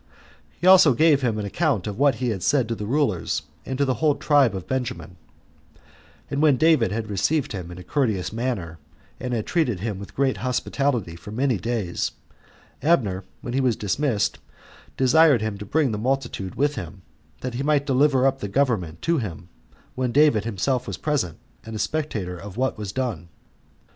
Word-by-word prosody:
He - - -3
also 185 -8 +7
gave 155 0 +4
him 115 -4 0
an 105 - -3
account 135 - 0
of 105 +1 -5
what 140 -3 +4
he 125 +2 -2
had 100 -5 -3
said 130 +3 +2
to - - 0
the 105 -2 -5
rulers, 110 - 0 0.2
and 130 - -3
to 140 - +2
the 130 - +1
whole 150 -3 +4
tribe 140 -8 +3
of 95 - -5
Benjamin; 90 -10 -4 1.2
and 140 - 0
when 150 -4 +5
David 155 - +4
had 110 +1 -3
received 140 - 0
him 90 -4 -5
in 90 - -9
a 90 - -9
courteous 110 - -1
manner, 110 -9 -3 0.4
and 125 0 -4
had 115 -3 -1
treated 125 - 0
him 105 -3 -3
with 100 - -10
great 135 -1 +1
hospitality 125 - -1
for 85 +4 -11
many 125 0 0
days, 105 -3 -2 0.7
Abner, 105 - +1 0.2
when 120 - -5
he 135 - +1
was 125 -4 +2
dismissed, 105 +2 0 0.6
desired 135 -2 +5
him 110 -2 -3
to 105 - -6
bring 145 +1 +2
the 105 - -3
multitude 120 -6 -2
with 145 +1 +1
him, 95 - -8 0.4
that 125 -1 -4
he 120 - -3
might 145 0 +2
deliver 135 -1 +3
up 135 0 +2
the 105 - -4
government 100 - 0
to 165 -2 +2
him, 90 -6 -6 0.4
when 125 -1 -1
David 135 -6 +4
himself 120 +4 -1
was 100 - -4
present, 135 - -1 0.3
and 110 0 -8
a - - -2
spectator 110 -9 -2
of 100 +2 -9
what 130 +1 0
was 105 -3 -5
done. 110 -10 -3
120 Hz, 190 wpm, -24 LUFS, 100-140 Hz, 1.2 s, also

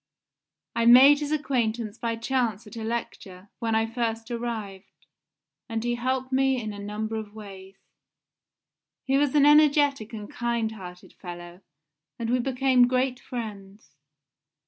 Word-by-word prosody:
I 230 0 +2
made 270 +4 +8
his 295 0 -4
acquaintance 235 -7 -1
by 230 -1 -2
chance 230 -3 -1
at 210 - -12
a 225 - -5
lecture, 205 -4 -6
when 225 -2 0
I 225 0 +2
first 225 0 -3
arrived, 220 -5 -6 0.6
and 225 0 -3
he 240 0 0
helped 260 +2 -2
me 265 0 +2
in 215 -2 -5
a 205 - -9
number 215 +2 -4
of 215 -1 -7
ways. 195 -2 -11 1.3
He 270 +1 +2
was 290 -1 +1
an 285 -1 +6
energetic 290 -5 +4
and 210 -3 -7
kind 235 -2 -2
hearted 180 -4 -11
fellow, 175 0 -10 0.6
and 235 -1 -3
we 250 - +2
became 255 0 +3
great 255 0 0
friends. 205 -8 -8
230 Hz, 145 wpm, -26 LUFS, 215-255 Hz, 1.3 s, made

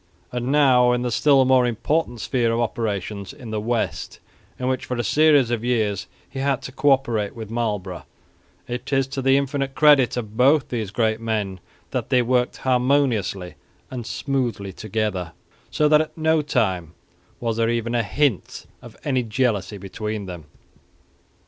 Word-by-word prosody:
And 125 0 -3
now, 130 -4 +5
in 125 0 0
the 125 - -1
still 135 +2 +4
more 130 -1 +4
important 120 +1 -1
sphere 120 -3 0
of 115 - 0
operations 105 -4 -3
in 120 -4 -10
the 105 -1 -2
West 115 +1 -2 0.4
in 125 - -3
which 130 0 -1
for 125 - -3
a 120 - -1
series 145 -3 +4
of 120 -1 -1
years 110 -5 0 0.2
he 135 - -7
had 135 -1 0
to - - -6
co 140 +2 +1
operate 120 -7 +1
with 110 -2 -8
Marlborough, 105 -6 -3 0.6
it 125 +2 -5
is 135 -1 +2
to 135 0 -3
the 135 +1 +4
infinite 140 -1 -2
credit 145 -5 +5
of 110 -3 -5
both 135 +4 +4
these 110 -5 -3
great 110 +1 0
men 105 -4 -2 0.3
that - - -3
they 125 -1 +3
worked 125 0 +1
harmoniously 125 -8 +1 0.4
and 120 -3 -6
smoothly 120 -8 -2
together, 105 -5 -3 0.4
so 150 - +2
that 150 0 +5
at 155 - -6
no 160 0 +2
time 95 - -1 0.4
was 115 -2 -2
there 115 0 +2
even 115 0 -1
a 120 - +2
hint 110 +2 -1 0.2
of - - -13
any 130 -3 +1
jealousy 110 -3 -1
between 105 +2 -5
them. 90 -4 -8
120 Hz, 170 wpm, -23 LUFS, 110-135 Hz, 0.6 s, now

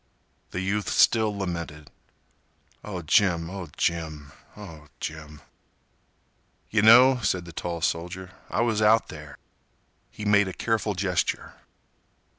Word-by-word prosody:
The 90 - -4
youth 100 +2 -1
still 110 -3 +3
lamented. 85 -5 -5 0.9
"Oh, 95 -4 -6
Jim—oh, 90 +1 +1
Jim—oh, 80 +1 -5
Jim—" 75 -1 -7 1.3
"Yeh 110 - +3
know," 125 +4 +7
said 90 -4 -1
the 85 - -11
tall 85 -1 -4
soldier, 90 +3 -3 0.2
"I - - 0
was 115 -2 +1
out 110 +1 +4
there." 75 -2 -10 0.7
He 105 - -9
made 100 -1 +4
a 95 - -5
careful 110 -1 -1
gesture. 90 -1 -1
90 Hz, 110 wpm, -25 LUFS, 80-105 Hz, 1.3 s, know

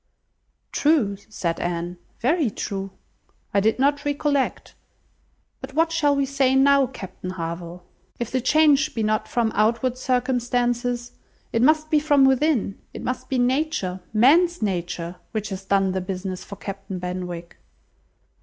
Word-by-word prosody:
"True," 285 -10 +2
said 170 -6 -2
Anne, 175 0 -3 0.2
"very 290 +1 +2
true; 195 -1 -4 0.6
I 200 - +4
did 220 +2 +2
not 285 +2 +2
recollect; 285 -1 -1 0.9
but 270 - -9
what 325 +1 +3
shall 295 -3 +2
we 280 0 +1
say 270 -1 +2
now, 275 0 +5
Captain 190 -7 -8
Harville? 170 0 -6 0.3
If 240 - -4
the 260 - 0
change 305 +2 +4
be 225 - 0
not 215 0 0
from 230 -2 0
outward 235 +4 +1
circumstances, 245 -1 0 0.4
it 230 - +2
must 310 +3 +3
be 305 - +5
from 290 -2 +4
within; 265 -6 +2 0.2
it - - -6
must 255 0 -4
be 265 - 0
nature, 250 -7 0
man's 320 +11 +4
nature, 175 -3 -3 0.2
which 215 -1 -2
has 190 -1 -6
done 195 -1 +2
the 190 0 -2
business 185 0 -5
for 200 - -9
Captain 195 -1 -6
Benwick." 180 -1 -5
240 Hz, 145 wpm, -23 LUFS, 190-280 Hz, 0.9 s, now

